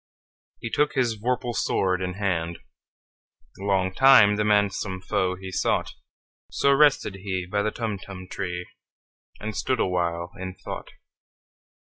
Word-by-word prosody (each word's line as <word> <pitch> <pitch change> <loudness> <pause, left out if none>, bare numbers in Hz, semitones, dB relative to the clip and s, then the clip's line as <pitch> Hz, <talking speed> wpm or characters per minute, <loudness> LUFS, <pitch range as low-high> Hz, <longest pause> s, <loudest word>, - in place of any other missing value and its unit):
He 115 - -5
took 150 0 +2
his 125 -4 +1
vorpal 120 +2 -1
sword 95 -4 0
in 90 -1 -3
hand:Long 95 +1 -4
time 130 -5 +7
the 105 - 0
manxome 100 -2 +1
foe 95 0 -1
he 95 0 -8
sought—So 140 +8 -2
rested 135 -8 +3
he 95 -1 -3
by 100 +3 -1
the 110 - 0
Tumtum 100 -4 -5
tree, 90 -1 -4 0.7
And 110 0 -5
stood 130 -2 0
awhile 85 -1 -1
in 95 0 -5
thought. - - -7
95 Hz, 120 wpm, -25 LUFS, 95-110 Hz, 0.7 s, time